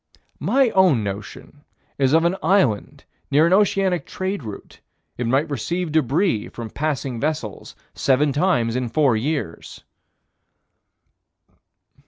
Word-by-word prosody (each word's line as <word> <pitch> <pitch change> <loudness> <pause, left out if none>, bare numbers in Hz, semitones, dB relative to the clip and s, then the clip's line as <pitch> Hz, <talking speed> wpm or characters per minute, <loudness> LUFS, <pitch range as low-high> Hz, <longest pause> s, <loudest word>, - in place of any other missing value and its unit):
My 240 - +2
own 180 - +4
notion 105 +8 -7 0.4
is 135 0 +2
of 165 +1 +4
an 175 +2 +2
island 135 - +1 0.3
near 150 +3 +4
an 170 - +3
oceanic 195 -3 +2
trade 190 -1 -3
route: 105 -5 -10 0.4
it 120 - -3
might 135 +6 +2
receive 165 +7 -3
débris 155 - +1
from 115 -2 -7
passing 140 -5 -3
vessels 145 -9 -4 0.2
seven 140 +2 +2
times 140 -8 +1
in 125 -2 -2
four 135 -1 +2
years. 130 - -4
145 Hz, 120 wpm, -22 LUFS, 120-175 Hz, 0.4 s, own